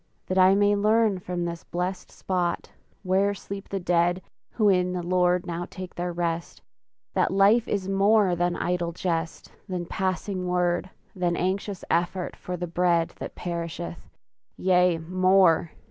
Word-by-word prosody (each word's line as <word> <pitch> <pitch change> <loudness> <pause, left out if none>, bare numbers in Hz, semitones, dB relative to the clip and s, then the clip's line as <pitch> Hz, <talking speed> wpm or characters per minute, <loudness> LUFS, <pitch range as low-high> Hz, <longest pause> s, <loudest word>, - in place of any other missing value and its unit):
That 185 0 0
I 185 +1 +6
may 205 0 +3
learn 215 -1 +2
from 175 -1 -3
this 170 -1 -5
blest 180 +2 -4
spot 180 -2 -2 0.3
Where 195 +2 +2
sleep 195 0 -8
the 195 - -2
dead 175 0 +1 0.3
who 215 -3 +2
in 180 -2 +3
the 180 -1 -3
Lord 180 0 +2
Now 175 0 -4
take 185 -1 -8
their 175 0 -3
rest 170 -1 -3 0.5
that - - +2
life 200 +4 +4
is 195 -2 -2
more 195 -1 +3
Than 175 0 0
idle 175 -1 -1
jest, 165 -2 -3 0.2
than 180 -2 -3
passing 185 +1 -2
word, 180 0 0 0.3
Than 175 -2 0
anxious 190 +2 -2
effort 175 +2 0
for 180 0 -6
the 175 - -3
bread 170 -1 +1
That - - -7
perisheth! 170 -1 -5 0.5
Yea, 180 -2 +3
more! 185 0 +3
180 Hz, 150 wpm, -26 LUFS, 175-190 Hz, 0.5 s, I